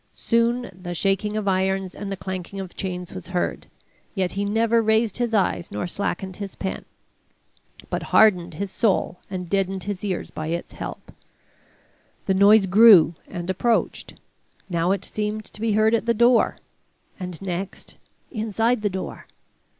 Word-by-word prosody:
Soon 235 Hz, +1 st, +1 dB
the 175 Hz, -1 st, -7 dB
shaking 195 Hz, +4 st, 0 dB
of 210 Hz, -2 st, -2 dB
irons 190 Hz, 0 st, 0 dB
and 200 Hz, -1 st, -6 dB
the 195 Hz, -, -3 dB
clanking 190 Hz, +1 st, -6 dB
of 190 Hz, -2 st, -7 dB
chains 180 Hz, -2 st, -5 dB
was 185 Hz, -2 st, -8 dB
heard, 180 Hz, -1 st, -2 dB, 0.5 s
yet 185 Hz, -2 st, 0 dB
he 200 Hz, -, -2 dB
never 230 Hz, +2 st, +2 dB
raised 220 Hz, 0 st, +2 dB
his 240 Hz, -2 st, 0 dB
eyes 195 Hz, -5 st, +1 dB
nor -, -, -3 dB
slackened 190 Hz, 0 st, -3 dB
his 200 Hz, -2 st, -6 dB
pen, 190 Hz, -, -4 dB, 1.1 s
but -, -, -1 dB
hardened 180 Hz, -6 st, +4 dB
his 200 Hz, +3 st, -4 dB
soul 195 Hz, -5 st, 0 dB
and 185 Hz, -2 st, -5 dB
deadened 195 Hz, 0 st, -1 dB
his 205 Hz, -1 st, -4 dB
ears 190 Hz, -4 st, -3 dB
by 155 Hz, -, -5 dB
its 170 Hz, +1 st, -3 dB
help. -, -, -8 dB, 1.1 s
The 190 Hz, -, +2 dB
noise 200 Hz, +2 st, +6 dB
grew 190 Hz, -4 st, +7 dB
and 175 Hz, 0 st, -6 dB
approached: 220 Hz, +5 st, 0 dB, 0.6 s
now 170 Hz, 0 st, +1 dB
it 195 Hz, 0 st, 0 dB
seemed 215 Hz, 0 st, -3 dB
to 210 Hz, -, -11 dB
be 225 Hz, -1 st, +1 dB
heard 215 Hz, +1 st, +3 dB
at 230 Hz, 0 st, +1 dB
the 235 Hz, -, +3 dB
door, 240 Hz, +1 st, +4 dB, 0.6 s
and 180 Hz, -3 st, -5 dB
next 190 Hz, 0 st, -6 dB, 0.3 s
inside 225 Hz, +1 st, 0 dB
the 210 Hz, -, +1 dB
door. 190 Hz, 0 st, -6 dB
195 Hz, 160 wpm, -23 LUFS, 185-215 Hz, 1.1 s, grew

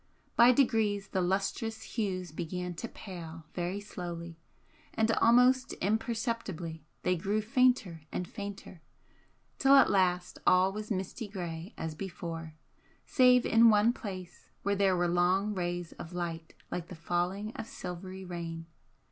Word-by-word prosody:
By 240 Hz, +1 st, +8 dB
degrees 220 Hz, -6 st, +2 dB
the 190 Hz, -, 0 dB
lustrous 195 Hz, +4 st, -1 dB
hues 185 Hz, -6 st, -3 dB
began 180 Hz, +3 st, -4 dB
to 205 Hz, +8 st, -5 dB
pale 165 Hz, -7 st, -9 dB
very 180 Hz, +3 st, -2 dB
slowly, 170 Hz, -4 st, -7 dB, 0.6 s
and 220 Hz, 0 st, +3 dB
almost 250 Hz, +3 st, +4 dB
imperceptibly 215 Hz, -, -2 dB, 0.2 s
they 180 Hz, -, +2 dB
grew 200 Hz, +5 st, 0 dB
fainter 230 Hz, -, +2 dB
and 180 Hz, -, -3 dB
fainter 200 Hz, -4 st, -8 dB, 0.8 s
till 275 Hz, 0 st, +6 dB
at 275 Hz, -, +6 dB
last 180 Hz, -2 st, +1 dB
all 185 Hz, +1 st, +5 dB
was 210 Hz, +1 st, -6 dB
misty 200 Hz, +3 st, -3 dB
grey 175 Hz, -1 st, -6 dB
as 160 Hz, -1 st, -4 dB
before, 165 Hz, -2 st, -6 dB, 0.5 s
save 250 Hz, -1 st, +5 dB
in 230 Hz, +1 st, +6 dB
one 215 Hz, +2 st, +5 dB
place 185 Hz, -6 st, -8 dB
where 200 Hz, 0 st, +1 dB
there 195 Hz, -2 st, +3 dB
were 175 Hz, 0 st, +2 dB
long 180 Hz, +4 st, +2 dB
rays 175 Hz, -2 st, -3 dB
of 165 Hz, -, -8 dB
light 165 Hz, -2 st, -4 dB, 0.2 s
like 175 Hz, -1 st, -3 dB
the 180 Hz, -, -9 dB
falling 180 Hz, +6 st, -2 dB
of 225 Hz, -, -6 dB
silvery 185 Hz, 0 st, -7 dB
rain. 165 Hz, -2 st, -5 dB
190 Hz, 140 wpm, -31 LUFS, 175-215 Hz, 0.8 s, By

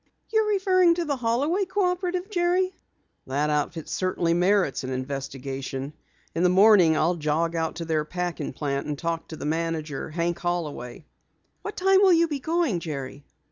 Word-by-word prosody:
"You're 440 Hz, -1 st, +3 dB
referring 370 Hz, -4 st, +4 dB
to 345 Hz, -1 st, -2 dB
the 285 Hz, -3 st, -1 dB
Holloway 265 Hz, -, +1 dB
Cooperative, 360 Hz, -1 st, -1 dB
Jerry?" 365 Hz, 0 st, +1 dB, 0.5 s
"That 145 Hz, +3 st, 0 dB
outfit 150 Hz, +2 st, -2 dB
certainly 180 Hz, -2 st, 0 dB
merits 180 Hz, -4 st, +2 dB
an 130 Hz, -, -4 dB
investigation. 135 Hz, +1 st, -5 dB, 0.4 s
In 165 Hz, -, -1 dB
the 180 Hz, -, +4 dB
morning 185 Hz, -4 st, +6 dB
I'll 165 Hz, +3 st, +2 dB
jog 165 Hz, +1 st, -1 dB
out 160 Hz, -1 st, -1 dB
to 170 Hz, -, -5 dB
their 160 Hz, -2 st, 0 dB
packing 175 Hz, +2 st, -4 dB
plant 140 Hz, -2 st, -3 dB
and 150 Hz, -1 st, -3 dB
talk 165 Hz, +1 st, -3 dB
to 160 Hz, -, -8 dB
the -, -, -6 dB
manager, 160 Hz, -2 st, -2 dB
Hank 170 Hz, +2 st, -2 dB
Holloway." 155 Hz, -7 st, -4 dB, 0.6 s
"What 415 Hz, -, -7 dB
time 385 Hz, +1 st, +4 dB
will 380 Hz, -3 st, +6 dB
you 335 Hz, 0 st, +4 dB
be 295 Hz, -3 st, -3 dB
going, 320 Hz, -, 0 dB
Jerry?" 140 Hz, -3 st, -6 dB
170 Hz, 165 wpm, -25 LUFS, -, 0.6 s, morning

